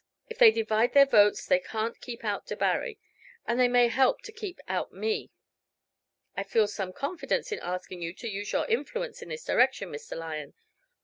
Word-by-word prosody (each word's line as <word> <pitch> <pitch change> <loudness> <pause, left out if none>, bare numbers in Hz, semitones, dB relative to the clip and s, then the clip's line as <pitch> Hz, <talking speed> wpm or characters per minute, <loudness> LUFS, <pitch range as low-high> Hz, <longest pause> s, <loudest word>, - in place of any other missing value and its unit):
If 460 0 -9
they 480 -3 +10
divide 225 - +1
their 280 -1 +8
votes 210 -6 +4
they 275 - +4
can't 225 -3 -4
keep 235 -2 -8
out 205 -1 -2
Debarry, 475 -3 -1 0.5
and 235 +1 0
they 250 - +6
may 245 0 +5
help 260 +2 +2
to 465 - -9
keep 415 -5 -7
out - - -2
me. 440 0 -2 1.1
I - - -1
feel 210 +2 +2
some 195 -3 -4
confidence 320 - -2
in 425 - -2
asking 180 0 -5
you 165 0 -3
to 235 - -7
use 205 -1 -4
your - - +1
influence 480 +1 -2
in - - -9
this 475 0 -6
direction, 250 -7 +2
Mr. 145 - -7
Lyon. 155 -3 -6
240 Hz, 185 wpm, -28 LUFS, -, 1.1 s, they